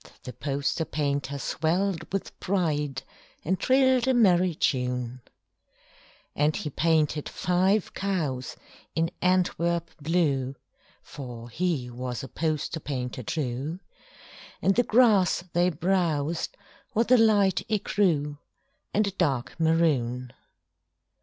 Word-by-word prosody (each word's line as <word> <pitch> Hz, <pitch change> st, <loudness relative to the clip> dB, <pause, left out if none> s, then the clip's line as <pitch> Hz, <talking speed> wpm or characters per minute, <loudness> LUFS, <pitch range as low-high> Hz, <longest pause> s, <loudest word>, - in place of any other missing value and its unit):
And -, -, -18 dB
the 125 Hz, -, -7 dB
poster 140 Hz, +5 st, -1 dB
painter 140 Hz, -3 st, -2 dB
swelled 170 Hz, +6 st, -1 dB
with 195 Hz, 0 st, -4 dB
pride 150 Hz, -8 st, -1 dB, 0.4 s
And 185 Hz, +4 st, 0 dB
trilled 260 Hz, -1 st, +3 dB
a 260 Hz, -, +3 dB
merry 185 Hz, -6 st, +4 dB
tune. 125 Hz, -3 st, -1 dB, 1.1 s
And 150 Hz, +1 st, +2 dB
he 150 Hz, -, -4 dB
painted 155 Hz, 0 st, +1 dB
five 185 Hz, +3 st, +1 dB
cows 155 Hz, -11 st, -2 dB, 0.4 s
in 165 Hz, 0 st, +1 dB
Antwerp 170 Hz, -2 st, +1 dB
blue 145 Hz, -5 st, +1 dB, 0.5 s
(For 120 Hz, -4 st, -9 dB
he 160 Hz, -3 st, -1 dB
was 125 Hz, 0 st, -5 dB
a -, -, -5 dB
poster 155 Hz, +2 st, -2 dB
painter 125 Hz, -5 st, -4 dB
true), 140 Hz, -, -3 dB, 0.8 s
And 195 Hz, -, +3 dB
the 245 Hz, -, +4 dB
grass 215 Hz, -8 st, +4 dB
they 175 Hz, +1 st, +3 dB
browsed 170 Hz, -2 st, 0 dB, 0.4 s
was 230 Hz, +3 st, +2 dB
a 255 Hz, -, +8 dB
light 205 Hz, -4 st, +4 dB
écru 170 Hz, -9 st, +1 dB, 0.6 s
And 210 Hz, +1 st, +3 dB
a 200 Hz, -, -2 dB
dark 155 Hz, -5 st, -1 dB
maroon. 135 Hz, -7 st, +1 dB
160 Hz, 115 wpm, -27 LUFS, 140-185 Hz, 1.1 s, a